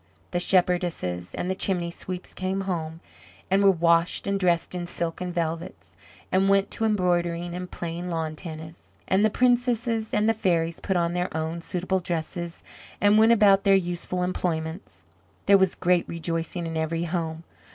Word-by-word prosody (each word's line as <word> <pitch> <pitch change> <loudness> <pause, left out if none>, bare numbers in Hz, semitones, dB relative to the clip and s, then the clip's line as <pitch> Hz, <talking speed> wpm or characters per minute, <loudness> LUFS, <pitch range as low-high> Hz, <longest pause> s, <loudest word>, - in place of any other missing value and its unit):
The 175 - 0
shepherdesses 175 - +1
and - - -3
the 190 - 0
chimney 180 -3 0
sweeps 180 +1 -7
came 190 +1 -2
home, 165 -4 -4 0.5
and 195 +1 +4
were 200 - +7
washed 170 -1 +2
and 200 0 0
dressed 175 -2 +1
in 175 -1 -4
silks 170 -1 -3
and 180 -1 -3
velvets, 165 - -4 0.4
and 190 +1 +3
went 195 0 +3
to 225 - -1
embroidering 175 -4 0
and 180 0 -5
playing 170 +1 -5
lawn 160 -2 -2
tennis. 160 - -9 0.2
And 190 +2 +3
the 215 - +5
princesses 240 -2 +1
and 210 +1 +2
the 225 - +4
fairies 170 -6 0
put 190 -2 -1
on 170 0 +1
their 180 0 -1
own 160 +2 -3
suitable 185 +2 -1
dresses, 170 0 -4 0.4
and 205 +1 +5
went 220 +1 +6
about 200 -3 +5
their 195 -1 +5
useful 180 0 -1
employments. 170 -1 -3 0.4
There 200 0 +6
was 190 -1 +2
great 180 -1 +1
rejoicing 165 +1 -3
in 165 -1 -3
every 160 +1 -1
home. 165 -1 -3
175 Hz, 170 wpm, -25 LUFS, 165-190 Hz, 0.5 s, were